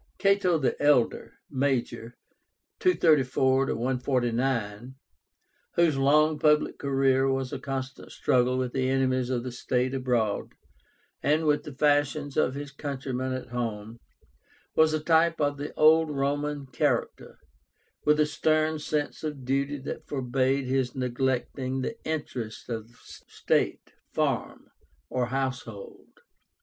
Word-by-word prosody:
CATO 195 -4 +3
THE 135 -4 -1
ELDER 145 -5 +2
(Major), 130 -3 -2 0.6
(234 135 - +3
149,) 125 -2 -1 0.8
whose 170 -4 +3
long 150 +3 +3
public 150 0 +2
career 135 -1 +2
was 135 -1 -2
a - - -3
constant 135 -1 -5
struggle 125 0 +1
with 130 -1 -2
the 130 -1 0
enemies 130 -1 +1
of 125 -2 -1
the 125 - -5
state 125 +1 -1
abroad, 120 -6 -1 0.7
and 155 +2 +2
with 150 -1 +2
the 150 - -7
fashions 145 0 +1
of 130 -3 +1
his 145 0 -6
countrymen 130 -2 -4
at 130 -1 -6
home, 115 -2 -4 0.7
was 160 0 +4
a - - 0
type 165 +1 +3
of 145 -1 0
the 145 +1 -5
old 160 +1 +5
Roman 145 0 -2
character, 130 - -2 0.7
with 150 0 +3
a 150 - +5
stern 155 +1 +1
sense 150 0 -3
of 150 -4 -5
duty 140 +2 0
that 135 - -7
forbade 135 0 0
his 130 -1 -1
neglecting 130 +1 -1
the 180 - -3
interests 130 -9 -5
of 115 -1 -4
state, - - -2 0.2
farm, - - -2 0.4
or 125 -1 0
household. 130 -5 -5
135 Hz, 125 wpm, -27 LUFS, 125-150 Hz, 0.8 s, old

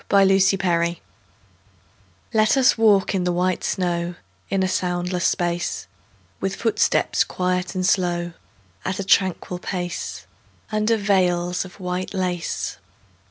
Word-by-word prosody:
VELVET 195 -1 +5
SHOES 175 -3 +2 1.4
Let 215 +4 +4
us 260 -1 +5
walk 210 -4 +4
in 190 -2 0
the 180 - +1
white 180 +1 0
snow 175 -1 -1 0.3
In 195 -1 +1
a - - +2
soundless 180 -1 0
space; 175 -1 -1 0.5
With 195 0 -2
footsteps 225 -1 +2
quiet 180 0 -2
and 185 0 0
slow, 175 -2 +1 0.5
At 190 - -2
a 200 - -2
tranquil 185 -2 +1
pace, 175 -1 -4 0.5
Under 215 +1 +2
veils 180 -3 +1
of 185 +2 -13
white 180 +1 -3
lace. 180 -2 -2
185 Hz, 120 wpm, -22 LUFS, 175-195 Hz, 1.4 s, VELVET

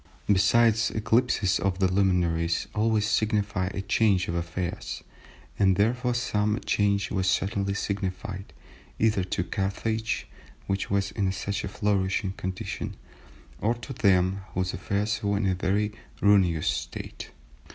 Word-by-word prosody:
Besides, 110 +3 +4
eclipses 110 -3 +2
of 95 -2 0
the 95 -1 +3
luminaries 90 -3 +1
always 110 0 +2
signify 105 -3 +1
a 100 0 -3
change 100 -2 +2
of - - -2
affairs, 85 +1 -4 0.6
and 95 -2 +4
therefore 120 +5 +1
some 105 -2 0
change 100 -1 +1
was 95 -2 +1
certainly 100 +1 0
signified, 100 0 -4 0.5
either 110 -4 +2
to 90 0 -1
Carthage, 110 +4 -2 0.4
which 100 0 -2
was 100 0 0
in 95 -2 0
such 100 +2 -3
a - - -2
flourishing 100 -2 0
condition, 95 -1 -5 0.6
or 115 +3 +1
to 120 +3 -8
them 95 -3 +2
whose 90 0 0
affairs 105 +3 -1
were 100 -1 +1
in 100 - 0
a 95 - +2
very 100 +3 0 0.3
ruinous 95 -6 +3
state." - - -4
100 Hz, 130 wpm, -27 LUFS, 95-105 Hz, 0.6 s, Besides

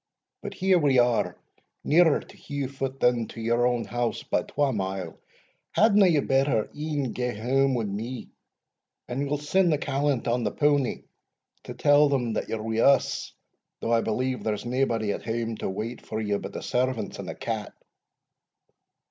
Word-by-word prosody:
But 205 -1 -7
here 190 -1 +3
we 140 -4 +3
are 120 -1 +2 0.5
nearer 160 0 +4
to - - -16
Heugh 140 -2 -4
foot 135 0 -4
than 120 -2 +2
to - - -10
your 120 +1 +1
house 120 -1 -2
by - - 0
twa 145 -2 0
mile, 95 -4 -4 0.5
hadna 210 -2 +5
ye 155 -5 +3
better 135 -5 +1
e'en 145 -4 -2
gae 125 0 -2
hame 130 +4 +1
wi' 120 - 0
me, 110 +4 -5 0.8
and 135 +3 -2
we'll 145 +1 0
send 170 +5 +2
the 150 - +2
callant 140 -2 -1
on 120 +1 +1
the 105 - 0
powny 145 -4 +1 0.6
to - - -7
tell 145 0 +5
them 125 -5 0
that - - -3
you - - -1
are 110 - -5
wi' 110 0 -2
us, 140 +4 +2 0.5
though 115 - -2
I 115 - +4
believe 125 +4 -1
there's 105 -1 -2
naebody 120 -4 0
at - - -5
hame 115 0 -2
to - - -3
wait 110 +5 -5
for 110 - -4
you 105 -2 -1
but - - -7
the - - -6
servants 125 -1 -1
and - - -6
the - - -5
cat." - - -4
125 Hz, 175 wpm, -26 LUFS, 115-145 Hz, 0.8 s, hadna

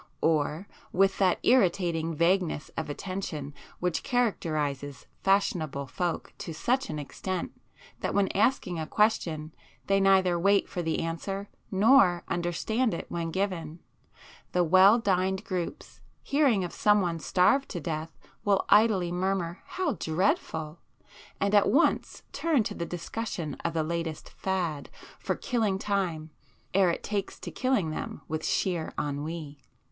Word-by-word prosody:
Or, 160 +3 +1 0.2
with 195 +1 +2
that 185 -2 +3
irritating 170 -8 +2
vagueness 170 -1 +1
of 160 -1 -3
attention 155 -3 -5 0.3
which 180 -2 0
characterizes 150 - -1 0.2
fashionable 160 -8 +1
folk 170 +5 -3
to 165 - -6
such 255 - 0
an - - -3
extent 170 +6 -4 0.5
that - - -2
when 200 -1 +3
asking 190 -6 +1
a 155 - -3
question 165 -8 +1 0.3
they 195 0 +3
neither 190 -3 +4
wait 200 +3 +3
for 175 - -4
the 160 -1 -1
answer 195 +5 -4 0.2
nor 195 -3 +5
understand 175 +6 0
it - - -5
when 170 -1 -2
given, 170 -4 -2 0.8
the 180 - +3
well 185 +6 +7
dined 190 -3 0
groups, 185 - -5 0.2
hearing 275 -9 +3
of 175 - -5
some 210 0 +4
one 170 -3 -1
starved 190 - +3
to 175 - -4
death, 160 +1 -4 0.3
will 200 -1 +2
idly 205 -5 +4
murmur 180 -1 -1
'How 360 -7 -1
dreadful!' 160 - -1 0.6
and 200 +1 +1
at 205 - +5
once - - +2
turn 315 -8 +1
to - - -4
the 170 - -4
discussion 175 -3 -4
of 170 - -2
the 160 - +1
latest 165 -1 -4
'fad' 175 -6 -2 0.3
for - - -1
killing 220 -7 0
time, 180 -6 -2 0.4
ere 190 -1 +4
it 170 - -2
takes 200 -2 -3
to - - -6
killing 255 -11 0
them - - -5
with 155 0 -3
sheer 175 -4 -1
ennui. 145 0 -4
180 Hz, 140 wpm, -28 LUFS, 160-200 Hz, 0.8 s, well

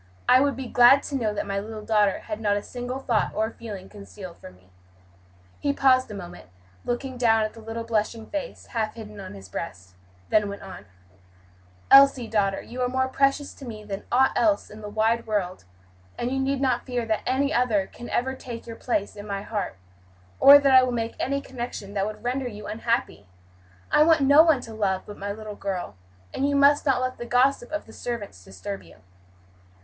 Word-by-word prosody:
I 255 - +6
would 280 0 +1
be 265 - -5
glad 245 +3 +6
to 285 - -4
know 225 -5 0
that 210 - -3
my 200 0 -2
little 215 +1 -7
daughter 210 -3 +2
had 215 0 -6
not 205 -1 +2
a 205 - -4
single 250 +1 -5
thought 240 -5 0
or 220 +1 0
feeling 205 -6 -8
concealed 200 -3 -11
from 90 - -12
me." 90 +1 -25 0.9
He 285 - 0
paused 260 -2 +3
a 210 - -7
moment, 90 - -10 0.3
looking 255 +1 -3
down 225 -2 +3
at 215 - -3
the 230 - -13
little 225 +1 -5
blushing 225 0 -1
face, 290 -2 -6
half 220 -2 -1
hidden 215 -2 -10
on 190 - -8
his 95 0 -11
breast, 90 0 -7 0.4
then 210 -1 +3
went 200 0 -8
on: 190 - -10 1.0
"Elsie, 275 -3 +7
daughter, 200 -3 0
you 250 +2 -7
are 250 - +1
more 260 +1 0
precious 275 +2 +1
to - - -14
me 220 -4 -8
than 200 -2 -6
aught 265 +2 +4
else 315 -3 +1
in 215 +1 -11
the 210 - -7
wide 225 +2 +1
world, 185 - -2 0.5
and 240 - -2
you 270 - -1
need 270 0 0
not 255 -2 0
fear 245 -2 -2
that 220 -1 -1
any 275 +3 +1
other 225 -7 +2
can 240 - -11
ever 265 +2 0
take 240 -3 -8
your 230 -1 -8
place 210 -5 -2
in 205 0 -9
my 200 -1 -3
heart, 205 - -4 0.6
or 280 +1 +10
that 280 -1 +3
I 260 - +9
will 255 0 0
make 230 -1 -2
any 280 +2 -1
connection 240 -6 -7
that 200 0 0
would 215 0 -8
render 255 +1 -1
you 210 -3 -8
unhappy. 230 - -2 0.6
I - - +5
want 320 -1 +5
no 285 +3 +7
one 320 -6 +4
to 225 - -9
love 195 -3 -1
but 205 - -10
my 200 +1 -3
little 215 0 -7
girl; 185 - -4 0.4
and 275 +1 0
you 285 - 0
must 285 +1 +4
not 255 -2 +3
let 255 0 -3
the 240 - -5
gossip 245 +1 +2
of 310 - -3
the 220 - -14
servants 210 - -6
disturb 95 +1 -7
you." 85 -3 -17
230 Hz, 210 wpm, -25 LUFS, 205-260 Hz, 1.0 s, or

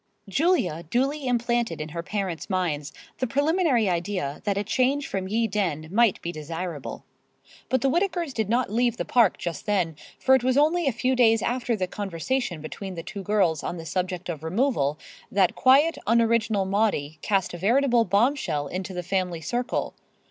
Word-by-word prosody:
Julia 200 - +1
duly 270 - 0
implanted 240 -3 0
in 155 +1 -5
her 170 +2 -4
parents' 185 -4 -4
minds 165 -6 -1 0.3
the 255 - 0
preliminary 285 - +2
idea 175 -5 -2
that 200 -2 0
a 200 - 0
change 260 +6 +1
from 190 -1 -3
Ye 225 +4 +1
Dene 180 -8 -2
might 225 -1 +3
be 170 - -2
desirable. 165 -1 -6 0.6
But 260 -2 +1
the 275 - +2
Whittakers 345 -3 0
did 220 -4 -1
not 240 -2 +1
leave 240 +1 +1
the - - -2
Park 235 -6 +3
just 170 +3 -5
then, 180 -6 +1 0.2
for 265 - +3
it 260 -2 +4
was 255 +1 +2
only 315 +2 +3
a - - +4
few 255 +3 0
days 225 -3 +4
after 245 -1 0
the 190 -3 -1
conversation 195 - -3
between 190 +4 -6
the 165 - -6
two 195 +3 -7
girls 190 -6 +1
on 175 - -4
the 165 - -8
subject 180 +2 -3
of 160 -4 -4
removal, 160 - 0 0.3
that 190 -3 +3
quiet, 280 +6 +4
unoriginal 230 -3 +2
Maudie 190 -7 0
cast 195 -4 0
a 175 - -6
veritable 240 +4 +3
bombshell 200 - +1
into 185 +4 -5
the 180 - -3
family 180 -2 -1
circle. 240 - -2
205 Hz, 175 wpm, -25 LUFS, 175-250 Hz, 0.6 s, it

